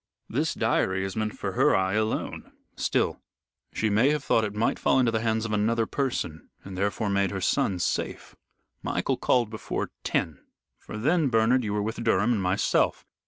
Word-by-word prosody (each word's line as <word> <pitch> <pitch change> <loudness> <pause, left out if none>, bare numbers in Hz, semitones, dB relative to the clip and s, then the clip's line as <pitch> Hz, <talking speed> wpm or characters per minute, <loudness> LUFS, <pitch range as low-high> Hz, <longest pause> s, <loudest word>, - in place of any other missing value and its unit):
"This - - -1
diary 95 +1 +1
is 95 - -5
meant 110 -1 -2
for - - -3
her - - +3
eye 95 0 +1
alone. 110 +1 -2 0.2
Still, - - 0 0.5
she 110 - 0
may 110 +6 +3
have 150 -1 0
thought 115 - +2
it 105 -1 -3
might 110 +2 0
fall - - +3
into 125 -3 +3
the 110 - 0
hands 110 0 0
of 110 - -3
another 110 +2 +1
person, 110 - -3
and 95 -1 -8
therefore 100 +3 -1
made 100 -1 +1
her 95 - -4
son 95 +1 +1
safe. 85 - -3 0.5
Michael - - -1
called 120 -4 +1
before 110 - -4
ten 75 -4 -1 0.4
for - - -8
then, 150 +5 +2
Bernard, 120 +2 +3
you 105 - -2
were 105 -1 0
with 110 +2 -4
Durham 115 +1 +3
and 105 - 0
myself. 95 +2 +1
110 Hz, 185 wpm, -26 LUFS, 100-115 Hz, 0.5 s, her